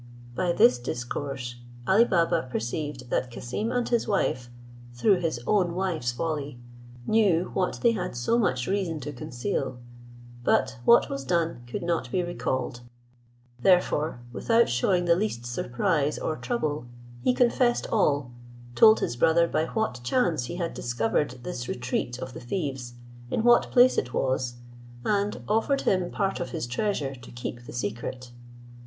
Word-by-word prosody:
By 175 +7 0
this 125 -7 +5
discourse, 120 +1 -4 0.3
Ali 215 +5 +6
Baba 170 - +1
perceived 125 +2 -4
that 125 - 0
Cassim 125 - -4
and 245 -1 0
his 235 -2 +1
wife, 125 - 0 0.5
through 185 - +3
his 165 -8 -1
own 180 -5 +2
wife's 170 -10 -1
folly, 145 0 -3 0.5
knew 195 -6 +2
what 185 - -1
they 235 - +6
had 180 - -3
so 120 - +1
much 130 - +1
reason 185 -4 -1
to 145 +2 -5
conceal; 130 +1 -3 0.7
but 115 - +1
what 235 - +6
was 140 0 -4
done 165 -4 0
could 120 - -4
not 170 -8 -1
be 180 - +1
recalled; 130 -8 -3 0.8
therefore, 160 -6 +2
without 230 - +3
shewing 175 +9 +2
the 170 - +5
least 170 - -2
surprise 145 +5 0
or 155 - -2
trouble, 155 - -2 0.4
he - - +4
confessed 245 0 +2
all, 145 - +2 0.4
told 220 - +7
his 120 - -1
brother 165 +6 +4
by 160 - 0
what 220 - -2
chance 160 - +1
he 170 - -5
had 170 -2 -3
discovered 120 +2 -1
this 125 -8 -5
retreat 125 0 -2
of 130 0 -7
the - - -8
thieves, 130 -3 -4 0.3
in 220 - 0
what 240 0 +5
place 250 +1 +5
it 125 - -5
was; 130 -2 0 0.5
and 205 0 0
offered 225 +6 +1
him 185 -2 +1
part 195 -1 -1
of 175 - -3
his 165 -7 -3
treasure 140 - -1
to 125 -2 -12
keep 120 0 -7
the - - -8
secret. 120 +2 -4
155 Hz, 155 wpm, -27 LUFS, 125-195 Hz, 0.8 s, told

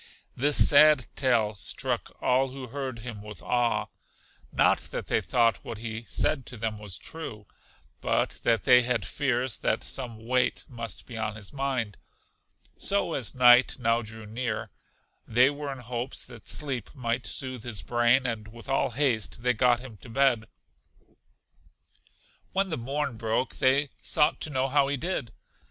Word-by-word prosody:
This 145 +3 +6
sad 150 -3 +6
tale 115 -6 +2
struck 100 - -2
all 130 +2 +3
who 130 -1 -8
heard 135 -1 -4
him 110 -2 -7
with 105 0 -10
awe, 120 -1 +1 0.7
not - - +3
that - - -6
they - - +1
thought 115 -2 +2
what 115 - -6
he 110 +1 -5
said 135 +2 0
to 125 - -7
them 110 -1 -3
was 100 -5 -6
true, 110 - -7 0.6
but - - 0
that 115 -5 +2
they 125 +5 +7
had 120 -4 0
fears 130 -1 -1
that - - 0
some 115 -4 -6
weight 125 +1 +1
must 115 -3 -7
be 115 -3 -8
on 110 -1 -2
his 105 +2 -7
mind; 130 -7 -2 0.8
so, 200 -4 +1
as 130 -2 -2
night 125 0 +6
now 115 -1 +1
drew 110 0 -8
near, 110 0 -4 0.6
they 125 +4 +5
were 145 -1 -5
in 135 - -6
hopes 125 +1 -5
that 120 -4 -12
sleep 130 -7 -2
might 120 -2 -2
soothe 130 -3 -3
his 110 -3 -3
brain, 120 +2 +3
and 110 -3 -3
with 115 +3 -12
all 135 0 +1
haste 120 -3 0
they 125 0 +3
got 120 +1 +3
him 125 -5 -10
to 115 - -14
bed. 120 -2 +2 2.1
When 190 0 +1
the - - 0
morn 135 0 -2
broke, 115 +3 -1
they 135 +2 +2
sought 150 -1 +2
to - - -1
know 135 -2 0
how 140 0 +3
he 140 0 -1
did? 160 -6 -3
125 Hz, 165 wpm, -27 LUFS, 115-135 Hz, 2.1 s, they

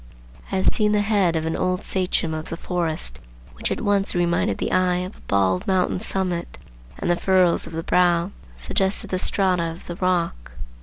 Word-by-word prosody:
I - - -1
have 190 - +4
seen 210 -1 +2
the 210 - +3
head 200 -5 +2
of 160 0 -1
an 160 - -1
old 185 0 -1
sachem 180 -3 -1
of 155 0 -5
the 165 - -5
forest 165 - -2 0.3
which - - -3
at - - -2
once 200 -2 +1
reminded 175 0 +1
the - - -2
eye 185 -1 +2
of 180 +3 -5
a - - -20
bald 95 -2 +1
mountain 185 -1 +1
summit, 180 -3 0 0.4
and - - -4
the 175 - +3
furrows 185 -1 +2
of - - -10
the 165 0 -3
brow 175 +1 +2 0.2
suggested 190 - -1
the 185 - 0
strata 185 -2 +2
of 165 0 -5
the 175 - -7
rock. 175 - -1
180 Hz, 195 wpm, -23 LUFS, 165-190 Hz, 0.4 s, have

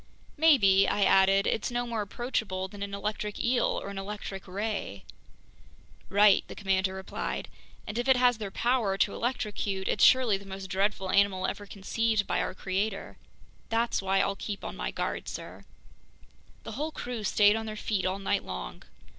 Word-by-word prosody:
"Maybe," 215 -12 +5
I 205 - +1
added, 195 +1 +5
"it's 220 - 0
no 245 0 -1
more 230 -2 -2
approachable 200 -3 -3
than 200 +1 -11
an 200 0 -3
electric 210 0 -4
eel 240 0 +1
or - - -6
an 200 -1 -5
electric 195 -1 -6
ray!" 195 - -4 1.1
"Right," 205 +1 +5
the - - -9
commander 190 -1 0
replied. 190 0 -4 0.4
"And 210 +3 -4
if 240 - -2
it 265 -1 +5
has 245 -2 +3
their 205 -2 -4
power 230 -3 +1
to 200 - +2
electrocute, 210 -5 -2
it's - - +1
surely 250 -6 +6
the 200 - -13
most 190 -1 -7
dreadful 195 0 0
animal 200 -2 +3
ever 205 - -4
conceived 215 +2 0
by - - 0
our 185 - -3
Creator. 195 +2 -3 0.5
That's 230 -1 +1
why 195 0 +2
I'll 200 - 0
keep 200 0 -6
on - - -5
my - - -3
guard, - - -3
sir." - - -8 1.0
The - - -7
whole 305 +3 -3
crew 245 -6 -5
stayed 205 +1 +4
on 225 0 -3
their 215 - -5
feet 210 -2 -1
all 185 +1 -1
night 195 - -1
long. - - -6
200 Hz, 175 wpm, -29 LUFS, 195-225 Hz, 1.1 s, surely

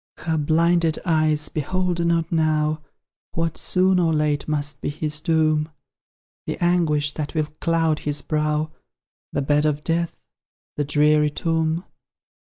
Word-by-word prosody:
Her 160 -2 -2
blinded 165 +2 +2
eyes 155 -3 +2
behold 175 +3 -1
not 170 -1 +1
now 155 -1 +1 0.5
What, 165 -1 -1
soon 185 0 +2
or 165 -2 +2
late, 150 -1 0
must 145 -2 -1
be - - -2
his 150 +1 -4
doom; 155 -1 +2 0.8
The - - -2
anguish 165 -4 +2
that 150 +1 -5
will 155 -1 0
cloud 165 -2 +1
his 145 -1 -3
brow, 150 0 0 0.6
The 140 - -1
bed 150 +2 +2
of 150 0 -1
death, 170 0 -1 0.6
the 145 - -1
dreary 150 +1 +3
tomb. 160 +2 -1
155 Hz, 135 wpm, -23 LUFS, 150-165 Hz, 0.8 s, dreary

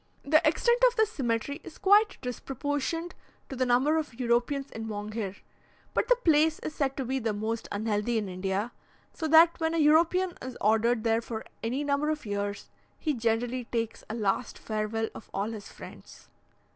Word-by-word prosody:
The 310 +2 +4
extent 475 +10 +2
of - - -1
this 440 -2 +2
cemetery 255 - -2
is 340 - -11
quite 415 +2 +4
disproportioned 290 +6 -3 0.4
to 270 - -5
the 255 0 0
number 260 +6 +3
of 280 -6 -7
Europeans 250 +3 0
in 225 0 -6
Monghyr; 210 -1 -4 0.6
but - - +1
the - - +5
place 320 -8 +3
is 310 - -6
said 275 -2 -1
to 265 - -2
be 265 +2 -1
the 225 -3 -1
most 220 +2 -3
unhealthy 210 +2 0
in 210 -2 -1
India, 190 +4 -2 0.4
so 320 - -3
that 325 +3 +6
when 325 0 0
a - - +1
European 335 +4 +4
is 255 -1 -7
ordered 220 +2 +2
there 225 0 +2
for 225 -1 -6 0.2
any 250 +6 -1
number 290 +1 0
of 305 -4 -2
years, 205 0 -4 0.3
he 305 - -1
generally 240 +1 -1
takes 230 -1 -3
a 220 - -3
last 210 +1 -1
farewell 220 +1 -2
of - - -11
all 200 +3 -1
his 215 -3 -8
friends. - - -13
245 Hz, 180 wpm, -28 LUFS, 220-305 Hz, 0.6 s, that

